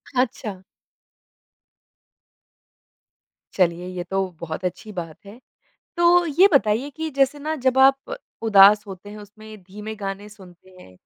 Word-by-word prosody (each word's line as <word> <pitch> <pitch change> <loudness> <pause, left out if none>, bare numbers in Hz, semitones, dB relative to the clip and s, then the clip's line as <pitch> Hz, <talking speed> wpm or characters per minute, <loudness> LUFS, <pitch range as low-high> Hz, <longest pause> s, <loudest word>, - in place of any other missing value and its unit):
अच्छा। 220 -6 -2 2.9
चलिए 175 -1 0
ये 180 -1 -6
तो 190 +1 -2
बहुत 170 +2 -6
अच्छी 210 +4 -5
बात 170 -5 -7
है। 210 +5 -13 0.6
तो 345 0 +4
ये 345 +6 +4
बताइए 240 +2 +2
कि 320 +2 -6
जैसे 275 +1 +1
ना 310 +2 -3
जब 260 -1 0
आप 270 +1 +3 0.3
उदास 205 -1 +6
होते 195 +1 -10
हैं 210 - -10
उसमें 215 +1 -13
धीमे 210 +3 -9
गाने 200 0 -6
सुनते 185 -3 -17
हैं 95 - -16
210 Hz, 130 wpm, -22 LUFS, 190-265 Hz, 2.9 s, उदास